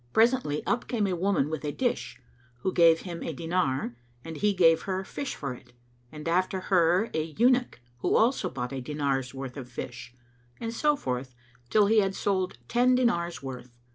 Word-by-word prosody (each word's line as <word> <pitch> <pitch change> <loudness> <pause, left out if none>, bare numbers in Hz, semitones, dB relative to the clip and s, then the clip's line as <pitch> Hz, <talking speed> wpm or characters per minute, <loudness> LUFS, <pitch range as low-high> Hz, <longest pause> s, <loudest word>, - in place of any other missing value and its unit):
Presently, 225 - +2
up 240 0 0
came 225 -4 0
a 185 -2 0
woman 185 -5 +1
with 155 -1 -4
a 150 - -1
dish, 245 - -2 0.4
who 190 - -1
gave 165 -1 +5
him 170 -3 -6
a 165 - -3
dinar, 140 -6 -1 0.3
and 165 0 -6
he 210 +4 +2
gave 165 -4 +4
her 190 0 -1
fish 275 +8 -5
for 140 -3 -4
it; 120 - -15 0.4
and 150 +1 -8
after 185 +3 +1
her 180 0 +3
an 155 0 -3
eunuch, 245 - +3 0.2
who - - +1
also 240 +4 +3
bought 125 0 -5
a 135 - -3
dinar's 135 -2 -2
worth 135 0 -6
of 125 -3 -7
fish, 120 0 -7 0.4
and 230 0 -4
so 295 +5 +2
forth 125 - -4 0.3
till 210 -1 +5
he 220 +2 +4
had 195 -1 +1
sold 185 - -1
ten 250 - +3
dinars' 170 - 0
worth. 125 -2 -8
170 Hz, 185 wpm, -28 LUFS, 135-205 Hz, 0.4 s, gave